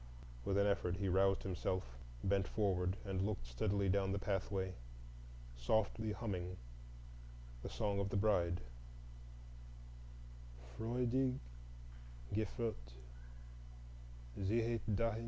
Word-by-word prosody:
With 100 - +2
an 100 - +5
effort 100 -3 +1
he 100 -1 0
roused 95 +1 +4
himself, 95 0 -1 0.4
bent 95 0 +2
forward, 95 -3 +1
and 95 -1 -1
looked 100 - -1
steadily 100 - +1
down 95 0 +3
the - - +1
pathway, 95 -1 -1 0.8
softly 110 - +1
humming 90 -4 -3 1.0
the - - -5
"Song 100 -1 0
of 100 0 0
the 100 - 0
Bride,"— 90 -4 +3 2.1
"Freudig 125 +3 +1 1.0
geführt, 110 - -2 1.5
ziehet 115 +3 +1
dahin." 115 +1 +1
100 Hz, 100 wpm, -39 LUFS, 95-110 Hz, 2.1 s, an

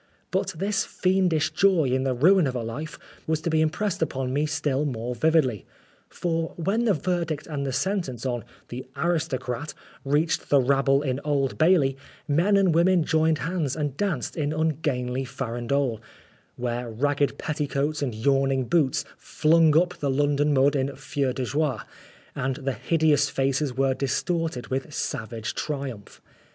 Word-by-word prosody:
But - - -1
this 200 +3 0
fiendish 185 -4 +1
joy 185 -8 +3
in 130 +1 +1
the 130 -1 0
ruin 175 +5 +5
of 130 - -3
a 120 - -2
life 140 +8 -6 0.3
was 160 -1 +1
to 165 - -2
be 155 0 +3
impressed 170 +5 -1
upon 130 -4 -1
me 145 +2 +1
still 145 -2 0
more 125 -4 -3
vividly. 135 - +2 0.5
For 165 -2 -2
when 200 +8 0
the 210 -5 +3
verdict 165 -3 -2
and 140 -3 -3
the - - -1
sentence 135 - -2
on 120 -2 -2
' - - -29
the 125 +2 -6
aristocrat 155 -5 -2 0.2
' - - -25
reached 150 +4 0
the 140 - +5
rabble 135 +1 +3
in 130 -2 -1
Old 135 -7 0
Bailey, 155 -6 +4 0.3
men 175 +8 +3
and 190 -4 +3
women 175 +1 +4
joined 160 0 +2
hands 165 -6 -1
and 145 -4 -2
danced 170 - -2
an 150 -2 0
ungainly 145 -5 -1
farandole, 125 -1 -2 0.6
where 120 0 -3
ragged 140 +5 0
petticoats 150 0 -2
and 125 -6 -2
yawning 135 +2 +2
boots 145 -1 +1
flung 160 -1 +3
up 180 +1 +3
the 145 - -1
London 145 +2 +2
mud 140 +1 +3
in 140 0 -1
feu 140 -2 -2
de 125 0 -3
joie, 145 -1 0 0.6
and 135 0 -2
the 135 -1 -3
hideous 160 0 +2
faces 135 0 -1
were 135 0 +2
distorted 150 +1 -2
with 135 +3 -3
savage 115 -6 -4
triumph. 135 -8 -5
145 Hz, 160 wpm, -25 LUFS, 130-160 Hz, 0.6 s, ruin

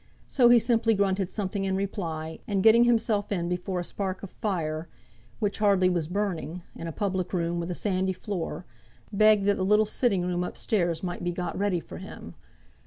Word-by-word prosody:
So 245 -3 +4
he 240 - +8
simply 230 -1 +2
grunted 195 -2 +1
something 195 -1 -3
in 190 -1 0
reply, 165 -5 -4
and 195 -2 0
getting 230 +2 +7
himself 225 -4 +2
in 175 -4 -1
before 180 +1 -2
a - - -2
spark 190 0 -4
of 200 - -7
fire 165 -6 -3 0.5
which 205 -3 -2
hardly 200 -3 +4
was 170 -3 -1
burning 180 -3 -3
in 165 - -6
a - - -3
public 190 +1 -2
room 170 -1 0
with 170 +1 -4
a 180 - -2
sandy 190 -1 0
floor, 180 -3 -5 0.5
begged 215 0 +5
that 205 0 +3
the 190 - -1
little 210 +3 +4
sitting 205 -4 +1
room 180 0 -1
up - - -6
stairs 175 -7 0
might 175 -1 -4
be 175 - 0
got 175 0 -4
ready 195 -2 0
for - - -10
him. - - -10
190 Hz, 195 wpm, -27 LUFS, 175-205 Hz, 0.5 s, he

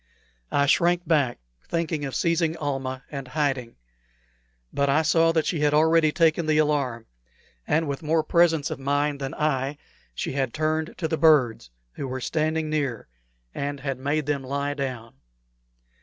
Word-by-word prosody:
I 140 - +3
shrank 175 +4 +2
back, 145 -7 +2 0.3
thinking 160 -3 -1
of 135 - -5
seizing 165 -1 +1
Almah 135 -3 -3
and 135 -3 -6
hiding. 135 -4 -2 1.0
But 140 0 +1
I 155 +4 +3
saw 165 +1 +4
that 160 -2 +1
she 165 - -1
had 150 0 +2
already 160 0 +4
taken 165 0 +2
the 155 -1 +3
alarm, 140 -7 0 0.6
and 160 0 +1
with 140 -1 -3
more 160 0 +1
presence 165 -3 +2
of - - -4
mind 145 +1 0
than 135 +3 -4
I 150 -4 0
had 145 +1 -7 0.4
she - - -3
had 135 -2 -2
hurried 155 +1 -1
to 165 - -1
the 160 0 -2
birds, 135 - +3 0.2
who 140 - -5
were 130 0 -4
standing 155 +4 -1
near, 140 - -2 0.4
and 140 0 -4
had 135 -2 -3
made 145 +2 -1
them 140 -2 -1
lie 140 +2 -2
down. 130 - -5
150 Hz, 165 wpm, -25 LUFS, 135-160 Hz, 1.0 s, saw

